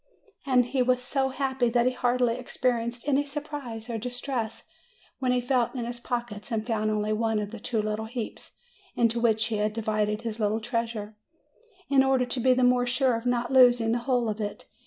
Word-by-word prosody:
And 250 -2 +4
he 255 +2 0
was 250 0 +3
so 265 +1 -1
happy, 265 -2 0
that 240 0 +2
he 255 - +3
hardly 245 -1 +1
experienced 240 -1 -2
any 285 0 +3
surprise 285 -6 -6
or 230 -2 -3
distress 245 -1 -4 0.5
when 255 -2 +1
he 250 - +2
felt 245 0 0
in 240 -2 -3
his 240 0 -5
pockets 240 -2 -4
and 220 -1 -1
found 215 -2 0
only 215 0 0
one 225 0 0
of 210 -1 -3
the 230 - -7
two 225 -1 -1
little 215 +1 -2
heaps 235 -1 -6 0.4
into 235 0 +2
which 220 -2 +3
he 225 -1 -1
had 210 0 0
divided 215 -1 -1
his 230 -1 -4
little 215 +1 +1
treasure, 225 -2 -3 0.7
in 275 -1 +4
order 265 -1 +2
to 245 +1 -2
be 255 +1 +4
the 255 - +2
more 245 0 +3
sure 255 0 +2
of 230 +2 -4
not 245 +1 0
losing 245 -3 +6
the 240 - +1
whole 245 -1 0
of 215 0 -3
it. 205 -1 -5
240 Hz, 200 wpm, -27 LUFS, 220-250 Hz, 0.7 s, losing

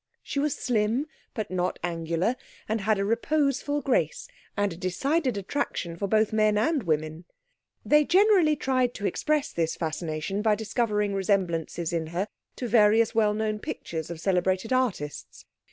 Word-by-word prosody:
She 280 - -3
was 295 0 0
slim, 230 +3 0 0.3
but 215 -3 -4
not 180 -1 -1
angular, 170 +5 -1 0.3
and 220 0 -1
had 215 +1 +2
a 195 - 0
reposeful 285 +5 0
grace 170 - 0 0.3
and 205 -3 +1
a - - -9
decided 250 - 0
attraction 195 -5 -3
for 200 +4 -2
both 215 +1 +2
men 215 -1 +3
and 285 +7 +2
women. 155 -1 -2 0.6
They 300 0 +5
generally 370 -4 +5
tried 255 -3 0
to 205 - -4
express 305 +6 0
this 165 -1 0
fascination 160 +4 -3
by 215 -1 +3
discovering 210 -1 0
resemblances 180 -4 -1
in 165 -1 -1
her 175 +5 -2 0.3
to 250 - -4
various 220 0 +4
well 215 -2 +2
known 215 0 -1
pictures 160 -5 -5
of 170 -2 -6
celebrated 185 +5 +1
artists. 220 - -2
210 Hz, 155 wpm, -27 LUFS, 175-250 Hz, 0.6 s, They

